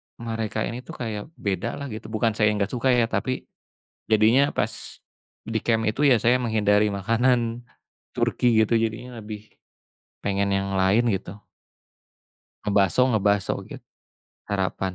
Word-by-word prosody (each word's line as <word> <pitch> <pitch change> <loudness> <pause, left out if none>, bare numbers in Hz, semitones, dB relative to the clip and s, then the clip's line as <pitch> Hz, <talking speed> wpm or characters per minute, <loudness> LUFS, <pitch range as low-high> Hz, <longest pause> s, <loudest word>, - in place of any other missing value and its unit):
mereka 115 -2 -3
ini 120 - -4
tuh 125 - -10
kayak 110 -4 -5
bedalah 100 +8 -3
gitu, 110 0 -7
bukan 110 +1 0
saya 105 -1 +3
enggak 100 0 -1
suka 125 +1 -1
ya 120 - +4
tapi 130 +2 -2 0.6
jadinya 115 +6 +4
pas 110 +1 -3 0.5
di 115 0 -1
camp 115 -2 +2
itu 135 +7 0
ya 125 -6 +5
saya 120 +2 +4
menghindari 105 -3 +2
makanan 115 +3 +1 0.5
Turki 125 - +1 0.2
gitu 115 +2 +1
jadinya 115 +2 -4
lebih 105 0 -9 0.7
pengen 100 0 0
yang 95 0 -1
lain 100 +6 +3
gitu. 100 +1 -4 1.2
Ngebaso 100 -1 +2
ngebaso 105 -2 +2
gitu. - - -10 0.7
Harapan. 95 -1 -1
110 Hz, 130 wpm, -24 LUFS, 100-120 Hz, 1.2 s, ya